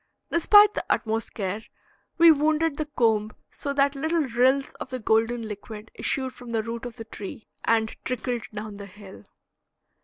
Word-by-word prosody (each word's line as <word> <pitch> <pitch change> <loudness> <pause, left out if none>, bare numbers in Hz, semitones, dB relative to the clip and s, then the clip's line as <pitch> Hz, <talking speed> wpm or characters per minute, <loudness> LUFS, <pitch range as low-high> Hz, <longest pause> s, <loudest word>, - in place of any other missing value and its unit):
Despite 415 +5 +6
the - - -2
utmost 225 0 -1
care, 200 0 -3 0.6
we 335 -1 +8
wounded 310 0 +2
the 310 - -2
comb 220 -6 +1 0.2
so 280 - -4
that 280 0 +3
little 315 +3 0
rills 260 +2 +2
of - - -6
the 255 - -3
golden 230 +1 +1
liquid 210 +1 -9
issued 260 -1 -1
from 245 -1 -11
the 225 -1 -1
root 230 +2 -5
of 240 - -10
the 225 -2 -8
tree 215 0 -8 0.2
and 225 -1 +1
trickled 245 -2 -3
down 210 -1 -7
the 200 0 -8
hill. 195 0 -13
235 Hz, 165 wpm, -25 LUFS, 220-280 Hz, 0.6 s, we